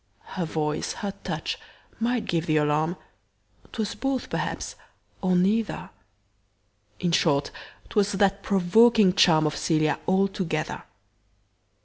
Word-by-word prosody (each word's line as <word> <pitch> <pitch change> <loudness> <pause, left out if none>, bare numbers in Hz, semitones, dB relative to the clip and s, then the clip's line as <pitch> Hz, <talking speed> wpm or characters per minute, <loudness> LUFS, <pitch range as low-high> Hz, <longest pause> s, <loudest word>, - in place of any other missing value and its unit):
Her 180 -3 -2
voice, 150 -1 -2
her 200 - -2
touch, - - -3 0.4
might 235 +1 0
give 165 -1 -1
th' 155 -1 +2
alarm 150 +3 +1 0.8
'Twas 220 -2 -3
both 270 +3 -3
perhaps, - - -3 0.5
or 185 -1 +2
neither; 205 +5 0 1.1
In 175 - 0
short, 145 -4 +2 0.4
'twas 205 -1 +1
that 195 0 +2
provoking 200 +1 +4
charm 160 -4 +5
Of 150 - 0
Cælia 155 -2 +1
altogether. 190 -4 -1
185 Hz, 110 wpm, -25 LUFS, 155-205 Hz, 1.1 s, charm